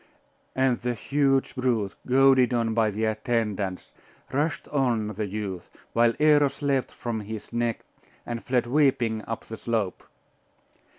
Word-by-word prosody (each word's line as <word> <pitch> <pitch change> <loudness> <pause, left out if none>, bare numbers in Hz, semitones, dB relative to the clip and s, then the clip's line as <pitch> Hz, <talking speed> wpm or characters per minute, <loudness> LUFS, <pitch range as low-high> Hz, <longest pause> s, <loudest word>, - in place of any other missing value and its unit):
And 130 -2 +2
the 120 0 -1
huge 135 +1 +1
brute, 120 -6 0
goaded 130 -1 +5
on 115 -1 +1
by 110 -1 +2
the 105 +2 -1
attendants, 110 -4 -2 0.4
rushed 145 0 -1
on 120 -7 +1
the 105 0 -3
youth, 100 -3 -5 0.2
while 115 0 +3
Eros 145 -2 +3
leaped 135 -2 +1
from 115 -2 -4
his 110 +1 -7
neck, 120 -1 -1 0.4
and 120 -1 -5
fled 125 -1 +1
weeping 125 -5 +2
up 115 - -5
the 110 - -7
slope. 110 -6 -2
120 Hz, 135 wpm, -26 LUFS, 110-130 Hz, 0.4 s, goaded